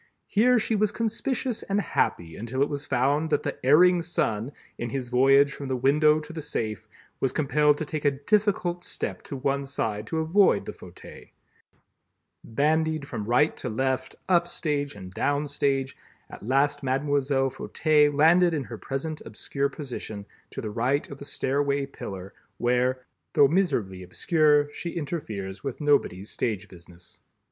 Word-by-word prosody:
Here 245 +4 +3
she 225 0 0
was 210 0 +2
conspicuous 230 +2 -2
and 200 +1 -1
happy 85 - -1
until 125 +5 -1
it 145 - -1
was 145 0 -5
found 140 +5 +1
that 150 - +1
the - - -5
Erring 175 +6 +6
Son 120 -8 -1 0.3
in 120 - -3
his 125 0 -4
voyage 135 +3 +5
from 140 - -7
the 130 - -1
window 150 +4 +4
to 160 - -10
the 160 - -5
safe, 110 -8 -4 0.3
was 135 - +1
compelled 150 +1 +2
to 155 - -3
take 150 0 -4
a 145 - +5
difficult 175 +4 0
step - - -4
to 140 - -7
one 140 +1 -1
side 110 -6 -3
to 160 - -3
avoid 170 +5 +3
the - - -6
fauteuil. - - -13 1.2
Bandied 155 +4 0
from 110 -6 -5
right 125 +7 +3
to 125 - -4
left, 130 +3 -1
up 175 -2 +3
stage 145 -4 -2
and 95 -2 -10
down 145 +6 0
stage, 135 -2 0 0.4
at - - -10
last 140 +5 +1
Mlle. 135 0 +1
Fauteuil 150 +2 +2
landed 165 +4 +4
in 145 - -2
her 115 -3 -9
present 150 +3 -4
obscure 140 +5 -3
position, 120 -8 -7 0.2
to - - -6
the 110 - -5
right 125 +6 0
of 140 - -8
the 140 - -8
stairway 140 0 0
pillar, 95 -8 -8 0.2
where, 125 +1 +1 0.3
though 140 - +6
miserably 120 - 0
obscure, 145 - +2
she 170 0 -5
interferes 105 - -5
with 135 - -4
nobody's 140 - +1
stage 105 -4 -2
business. 90 -1 -15
140 Hz, 160 wpm, -26 LUFS, 125-155 Hz, 1.2 s, Erring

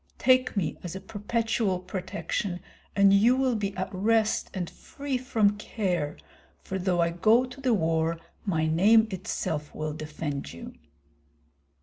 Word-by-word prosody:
Take 255 -3 +3
me 175 -6 -1
as 175 0 -6
a - - -4
perpetual 210 0 -1
protection, 185 0 -3 0.4
and 200 0 +6
you 225 +6 +5
will 260 -1 +2
be 200 -2 -3
at 185 - -3
rest 215 +3 +1
and 180 -3 -3
free 280 +8 -6
from 220 -5 +1
care, 180 -9 -2 0.5
for 190 - -4
though 180 -1 +1
I 170 0 +2
go 220 +8 +4
to 250 +2 -11
the 255 -4 +3
war 165 -2 0 0.2
my 160 -6 0
name 210 +8 +5
itself 170 -6 -3
will 155 0 -3
defend 150 - -5
you." 85 - -9
195 Hz, 145 wpm, -27 LUFS, 170-225 Hz, 0.5 s, and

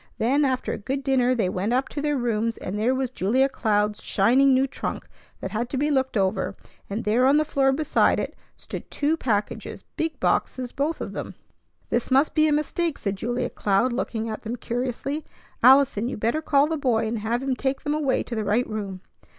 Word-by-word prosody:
Then 270 +6 +2
after 260 -1 -1
a - - -5
good 270 +6 -3
dinner 255 -2 +2
they 220 -6 +1
went 190 +5 -1
up 260 +2 +1
to 290 - -4
their 295 -1 0
rooms, 230 -2 -1
and 185 - -5
there 230 +5 +1
was 260 -1 -2
Julia 255 +5 +2
Cloud's 210 -5 0
shining 255 +7 +3
new 260 +1 +4
trunk 270 - -5 0.3
that - - -5
had 235 +3 -2
to 270 - -3
be 295 +3 +1
looked 265 -4 +1
over; 190 0 0 0.3
and 210 +4 -3
there 235 +5 +3
on 280 +2 +5
the 305 - +2
floor 270 -2 +2
beside 300 +3 +2
it - - -4 0.2
stood - - -8
two 300 +2 0
packages, 215 -9 -2
big 320 -1 -2
boxes, 255 -2 0
both 300 +4 -2
of - - -5
them. - - -6 0.6
"This 235 - 0
must 270 +3 +3
be 310 0 +4
a - - +2
mistake," 305 +2 0
said 200 -1 -2
Julia 240 +5 -2
Cloud, 210 +5 +1
looking 230 -3 -2
at 220 -1 -5
them 230 +2 -4
curiously. 250 +5 -3 0.4
"Allison, 260 -3 +5
you - - -5
better 230 +9 0
call 285 -2 +3
the 320 +1 -2
boy 240 -6 +1
and 220 +1 -2
have 230 +4 -1
him 270 -1 0
take 265 +1 -2
them 295 - 0
away 295 -4 +1
to - - -8
the 220 -2 -1
right 210 +5 +1
room." 200 -4 -5
250 Hz, 210 wpm, -24 LUFS, 220-275 Hz, 0.6 s, on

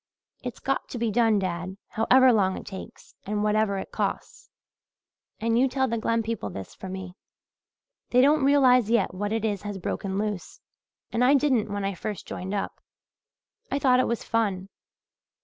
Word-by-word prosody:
It's 245 -2 -6
got 270 0 -2
to - - -5
be 230 -1 0
done, 225 -1 +3
dad, 185 0 -3
however 255 +3 +5
long 190 -3 +2
it - - -8
takes, 190 -2 -10
and 210 +1 -2
whatever 210 -1 +2
it 190 - -6
costs, - - -4 0.9
and 230 +1 +1
you 265 - +4
tell 265 0 0
the 230 -1 -1
Glen 230 +1 0
people 220 - -3
this 95 +1 -8
for 190 - -8
me. 190 -1 -6 1.0
They 250 - +3
don't 285 +3 +5
realize 255 -5 +5
yet 235 -5 +2
what 205 +3 -3
it 225 0 0
is 205 -3 -1
has 205 -1 -5
broken 190 +1 -3
loose 210 -3 -3 0.5
I 250 +4 +4
didn't 255 -7 +2
when 205 -1 -2
I 195 - -1
first 205 +1 -5
joined 190 +3 -5
up. 200 - -4 0.9
I - - 0
thought 255 -3 +4
it 255 - +2
was 235 - -2
fun. 195 -4 -1
220 Hz, 175 wpm, -26 LUFS, 195-250 Hz, 1.0 s, however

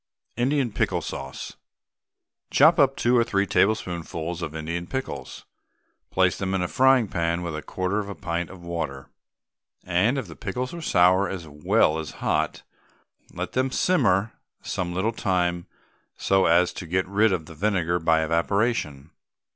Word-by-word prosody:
INDIAN 130 0 +1
PICKLE - - -1
SAUCE. 65 0 -7 0.9
Chop 165 +1 +5
up 135 -1 +4
two 120 -1 +2
or 120 - +5
three 100 -4 0
tablespoonfuls 85 -4 -1
of 80 -1 -5
Indian 85 +2 -4
pickles, 130 +5 -6 0.6
place 95 -1 +2
them 95 0 -1
in 95 - 0
a - - -1
frying 130 +1 +4
pan 85 -1 -1
with 85 -3 -4
a 75 - -4
quarter 95 +5 -2
of 100 -1 -4
a 100 - -6
pint 85 -2 -3
of 95 -2 -12
water, 80 -6 -5 0.7
and 95 +9 +1
if 135 - -2
the 85 -4 -11
pickles 125 - -4
are 170 - -6
sour 95 - +3
as 90 -4 -6
well 75 +1 +2
as 80 - -6
hot, - - -1 0.7
let - - -5
them 130 +1 0
simmer 115 - +2 0.3
some 90 -1 -3
little 95 +6 -1
time 90 -5 -1 0.5
so 95 -1 +2
as 90 +2 +3
to 90 - -7
get 95 +3 0
rid 105 +3 +3
of 85 -4 -1
the 85 - -11
vinegar 90 -1 0
by 80 -1 +2
evaporation. 85 - -1
90 Hz, 160 wpm, -25 LUFS, 85-110 Hz, 0.9 s, Chop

